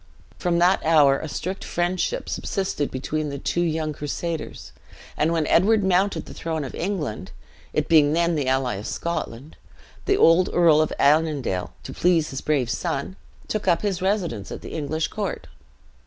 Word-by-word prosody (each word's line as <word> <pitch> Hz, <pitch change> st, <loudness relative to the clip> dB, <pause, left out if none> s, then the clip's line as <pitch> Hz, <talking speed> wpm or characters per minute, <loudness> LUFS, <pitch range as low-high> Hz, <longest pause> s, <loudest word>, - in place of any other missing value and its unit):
"From 175 Hz, -2 st, +1 dB
that 180 Hz, +3 st, +3 dB
hour 150 Hz, -4 st, +5 dB
a 160 Hz, -, -6 dB
strict 185 Hz, +6 st, -4 dB
friendship 180 Hz, -, -1 dB
subsisted 190 Hz, -7 st, -2 dB
between 150 Hz, +3 st, -3 dB
the 140 Hz, -, -5 dB
two 170 Hz, +5 st, -1 dB
young 160 Hz, -2 st, -1 dB
crusaders; 155 Hz, +2 st, -5 dB, 0.4 s
and 155 Hz, +2 st, +1 dB
when 165 Hz, -2 st, +1 dB
Edward 205 Hz, +7 st, +3 dB
mounted 190 Hz, +1 st, +1 dB
the -, -, -10 dB
throne 160 Hz, -2 st, -3 dB
of 135 Hz, -, -7 dB
England, 155 Hz, -, -3 dB, 0.4 s
it -, -, -1 dB
being 150 Hz, -2 st, +5 dB
then 170 Hz, +1 st, +2 dB
the 145 Hz, -4 st, -1 dB
ally 130 Hz, -5 st, 0 dB
of 105 Hz, -, -6 dB
Scotland, 155 Hz, -4 st, -4 dB, 0.5 s
the 400 Hz, -, +2 dB
old 175 Hz, -, +5 dB
Earl 165 Hz, -3 st, +5 dB
of 155 Hz, -, 0 dB
Annandale, 145 Hz, -, +1 dB
to -, -, -8 dB
please 170 Hz, -3 st, +2 dB
his 135 Hz, -, -5 dB
brave 135 Hz, -6 st, 0 dB
son, 140 Hz, +9 st, -3 dB, 0.3 s
took 215 Hz, -2 st, -3 dB
up 175 Hz, +1 st, +3 dB
his 195 Hz, -4 st, -1 dB
residence 185 Hz, -, -1 dB
at -, -, -6 dB
the -, -, -8 dB
English 155 Hz, +1 st, -2 dB
court. 205 Hz, -3 st, -4 dB
160 Hz, 170 wpm, -23 LUFS, 145-180 Hz, 0.5 s, hour